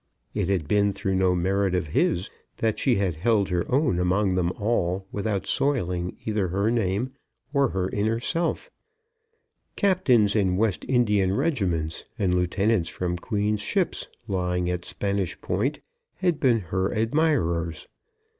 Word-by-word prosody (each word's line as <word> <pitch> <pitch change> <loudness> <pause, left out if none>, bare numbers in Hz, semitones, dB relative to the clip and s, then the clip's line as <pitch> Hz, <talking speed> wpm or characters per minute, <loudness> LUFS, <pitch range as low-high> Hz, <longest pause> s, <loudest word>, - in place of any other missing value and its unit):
It 100 -3 -1
had 90 -7 0
been 100 +2 +2
through 95 0 -2
no 95 -1 +3
merit 95 +1 +1
of 90 - 0
his 85 +4 0 0.3
that 110 -2 0
she 125 - +3
had 95 -5 0
held 100 +2 +2
her 90 -1 -1
own 130 - +2
among 95 +2 +2
them 90 -1 +1
all 95 -4 -1
without 100 -1 -2
soiling 90 -11 0
either 105 -3 0
her 100 +5 0
name 115 +2 0 0.4
or 140 -3 +3
her 95 -1 -1
inner 110 +3 0
self. 170 - -1 1.0
Captains 130 - +3
in 95 -4 +2
West 105 -3 0
Indian 105 -7 +2
regiments, 95 - -1
and 95 -5 +1
lieutenants 90 +2 +1
from 90 -1 -2
Queen's 105 +3 -1
ships 190 - -1 0.2
lying 90 -3 -1
at 90 -1 -4
Spanish 100 -3 -2
Point, - - -1 0.3
had 175 -4 0
been 120 -4 +3
her 95 +2 -1
admirers. 110 - 0
100 Hz, 145 wpm, -25 LUFS, 90-115 Hz, 1.0 s, no